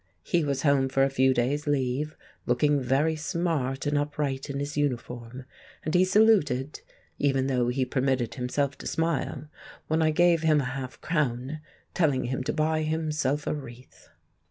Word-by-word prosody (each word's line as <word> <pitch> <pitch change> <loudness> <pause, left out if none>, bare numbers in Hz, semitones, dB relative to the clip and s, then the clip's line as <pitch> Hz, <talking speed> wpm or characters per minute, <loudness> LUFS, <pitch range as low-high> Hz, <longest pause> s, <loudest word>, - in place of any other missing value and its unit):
He 170 -2 +1
was 140 -2 -1
home 140 -3 +3
for 135 +1 +2
a 135 - +2
few 130 0 +3
days' 135 +4 0
leave, 145 +1 -1 0.3
looking 140 +4 +2
very 140 +6 +1
smart 155 -5 -2
and 145 0 +1
upright 145 -2 -2
in 140 - -3
his 145 +1 -4
uniform; 125 -3 -3 0.4
and 155 - -2
he 180 - +5
saluted 185 - +3 0.4
(even 135 -2 +2
though 125 -3 +1
he 130 +1 0
permitted 130 -2 0
himself 135 +2 -1
to - - -6
smile) 160 -3 -1 0.4
when 160 +1 +1
I 160 - +3
gave 170 +1 +3
him 155 -2 +4
a - - 0
half 130 -2 -6
crown, 150 -2 -1 0.3
telling 145 -7 +2
him 130 +2 -2
to - - 0
buy 155 0 +1
himself 155 -2 -1
a - - 0
wreath. 125 -4 -11
145 Hz, 165 wpm, -27 LUFS, 130-155 Hz, 0.4 s, he